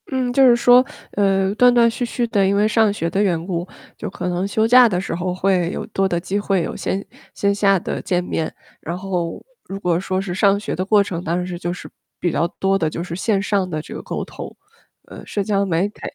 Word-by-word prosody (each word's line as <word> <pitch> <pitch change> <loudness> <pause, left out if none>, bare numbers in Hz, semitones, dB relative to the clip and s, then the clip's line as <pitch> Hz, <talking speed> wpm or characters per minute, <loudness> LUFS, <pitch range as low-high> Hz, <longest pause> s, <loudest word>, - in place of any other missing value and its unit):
嗯， 255 -2 -1
就 270 0 +6
是 240 - +6
说， 245 +1 +5 0.3
呃， 195 -1 +1
断 245 +2 +5
断 235 -1 +5
续 240 +2 -4
续 240 +1 -1
的 205 -4 +2
因 195 +1 +2
为 205 +1 +3
上 220 -1 +3
学 170 -5 -2
的 195 +4 0
缘 175 -5 0
故， 175 -1 -3 0.3
就 210 - -5
可 180 -1 -5
能 180 +2 -1
休 220 +2 +1
假 245 0 +7
的 180 -3 0
时 190 - -4
候 180 +1 -2
会 185 -2 +1
有 - - -4
多 195 -3 0
的 175 - 0
机 190 +3 -2
会 195 -3 0
有 - - -4
线 195 +1 -3 0.3
线 200 0 +1
下 200 -1 +3
的 - - -4
见 180 -1 0
面。 160 -2 -3 0.3
然 170 +2 -4
后 180 -3 -3 0.2
如 195 +1 -6
果 175 -3 +1
说 185 0 -2
是 190 -2 -4
上 200 +2 +3
学 210 - -4
的 185 - -1
过 205 +1 +4
程， 175 -3 -5
当 170 +1 -1
然 180 - -2
是 180 -1 -5
就 175 -1 -3
是 180 - -8 0.3
比 175 - 0
较 170 - +1
多 195 0 +2
的 160 - +1
就 165 - -5
是 170 -1 -6
线 195 +1 0
上 195 -2 0
的 155 -3 -3
这 - - -10
个 - - -6
沟 - - -4
通， - - -9 0.5
呃， - - -11
社 205 - -2
交 200 0 +1
媒体。 190 +3 -1
195 Hz, 270 characters per minute, -20 LUFS, 180-205 Hz, 0.5 s, 假